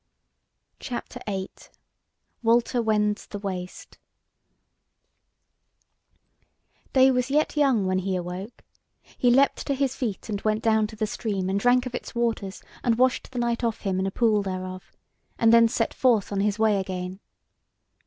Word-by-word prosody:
CHAPTER 245 0 -6
VIII: 190 -2 -3 0.9
WALTER 235 +1 +2
WENDS 210 -2 0
THE 205 - -6
WASTE 185 -3 -7 2.9
Day 265 0 +6
was 250 0 0
yet 300 +3 +1
young 270 -9 +3
when 185 0 +1
he 190 0 -2
awoke: 180 +5 -6 0.5
he 245 - +2
leapt 270 +3 +3
to 280 - +1
his 270 -1 0
feet, 225 -8 -4
and 205 -2 -3
went 215 0 0
down 220 -1 +3
to 220 - -11
the 215 0 -1
stream 200 -3 -2
and 200 - +1
drank 245 +3 +3
of 255 - -6
its 245 - -6
waters, 225 -5 -2 0.2
and 230 -2 +2
washed 255 +1 +2
the 260 - -9
night 235 0 -1
off 230 -2 -1
him 190 -2 -1
in 190 - 0
a - - -2
pool 220 -1 +2
thereof, 185 -1 -6 0.5
and 230 0 +4
then 230 0 +7
set 225 0 -1
forth 235 -7 +2
on 200 - -1
his 205 +1 +1
way 215 -2 +3
again. 185 0 -5
220 Hz, 155 wpm, -25 LUFS, 195-245 Hz, 2.9 s, then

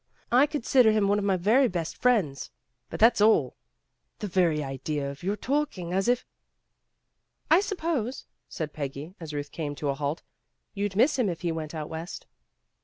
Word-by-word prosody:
I 255 +5 +6
consider 255 -5 +3
him 215 -2 +2
one 205 +1 +2
of 200 - -2
my 195 -2 +2
very 225 +9 +4
best 170 -6 -3
friends. 190 - +1 0.4
But - - -6
that's 225 -1 +5
all. 220 +1 +4 0.6
The 215 - -5
very 170 -5 +2
idea 140 +1 -3
of 140 - -12
your 195 +3 -1
talking 230 - -2
as 195 +3 +1
if 245 0 +2 1.3
"I 330 - +8
suppose," 325 - -2 0.2
said 155 -2 -5
Peggy, 145 +3 -6
as 165 -3 -7
Ruth 145 -1 -5
came 150 -3 -4
to 145 0 -3
a - - +2
halt, 145 +3 -3 0.5
"you'd 200 -1 -2
miss 260 +6 +3
him 225 -6 +2
if 170 -2 -5
he 175 -2 -1
went 160 -1 -5
out 155 -1 -4
West." 160 +2 -7
185 Hz, 180 wpm, -27 LUFS, 155-235 Hz, 1.3 s, I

